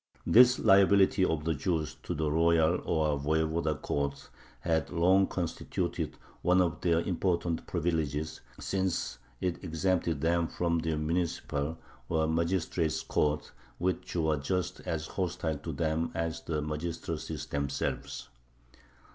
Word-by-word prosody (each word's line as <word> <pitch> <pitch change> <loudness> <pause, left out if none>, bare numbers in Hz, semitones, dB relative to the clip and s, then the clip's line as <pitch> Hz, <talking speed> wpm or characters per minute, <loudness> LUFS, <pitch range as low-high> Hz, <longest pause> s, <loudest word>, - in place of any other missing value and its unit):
This 125 +2 +7
liability 95 0 +5
of 80 -4 0
the 80 - +2
Jews 80 +1 -1
to - - -4
the 75 -1 0
royal 80 +1 +3
or 75 -3 +1
voyevoda 80 +1 0
courts 70 0 -2 0.3
had 80 0 0
long 95 +3 +4
constituted 85 -3 -3 0.2
one 90 +1 +4
of 85 -3 +1
their 85 -1 +3
important 85 -2 -1
privileges, 80 -3 -1 0.2
since 95 -9 -1 0.2
it 90 0 -2
exempted 85 -2 0
them 85 +1 +2
from 85 -1 0
the 80 -1 -1
municipal, 80 -2 -1 0.3
or 80 -1 +2
magistrates' 85 0 0
courts, 75 0 0 0.3
which 90 +1 -2
were 80 -3 +2
just 90 +5 -2
as 80 -1 -2
hostile 85 -4 -2
to - - -5
them 80 0 0
as 80 -1 -2
the 75 -2 -2
magistracies 75 -1 -4
themselves. 70 -2 -3
80 Hz, 125 wpm, -30 LUFS, 80-90 Hz, 0.3 s, This